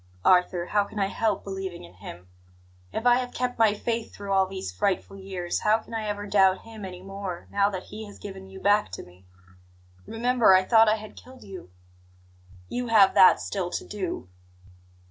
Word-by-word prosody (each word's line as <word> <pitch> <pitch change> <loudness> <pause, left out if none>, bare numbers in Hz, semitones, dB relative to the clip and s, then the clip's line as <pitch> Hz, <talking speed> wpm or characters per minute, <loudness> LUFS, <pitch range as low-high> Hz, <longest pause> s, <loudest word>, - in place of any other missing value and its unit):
"Arthur, 180 -1 +3
how 205 +3 +1
can 205 - -11
I 200 - +2
help 210 +1 -1
believing 190 -2 -6
in 85 +1 -14
Him? 90 -1 -11 0.6
If 225 - -4
I 245 0 +6
have 250 -1 -3
kept 250 -1 -2
my 215 -2 +4
faith 230 +2 -3
through 200 -1 -6
all 190 -1 +3
these 190 - -6
frightful 190 - -1
years, 190 -3 -4
how 215 +1 +3
can 225 - -13
I 220 -1 -3
ever 205 0 -3
doubt 190 -2 +3
Him 220 -3 -9
any 180 -1 -9
more, 195 -2 -6
now 200 0 +2
that 185 -2 -5
He 215 +1 -9
has 205 - -12
given 190 -1 -9
you 190 0 -11
back 205 +2 +3
to - - -6
me? 90 +1 -19 0.8
Remember, 235 -3 +4
I 185 - +4
thought 225 0 +5
I 215 - +3
had 215 -1 -10
killed 255 0 -14
you." 190 - -10 1.0
"You 245 0 -3
have 210 -4 +5
that 185 - +7
still 190 -3 -3
to - - -4
do." 185 - -5
200 Hz, 195 wpm, -26 LUFS, 185-220 Hz, 1.0 s, that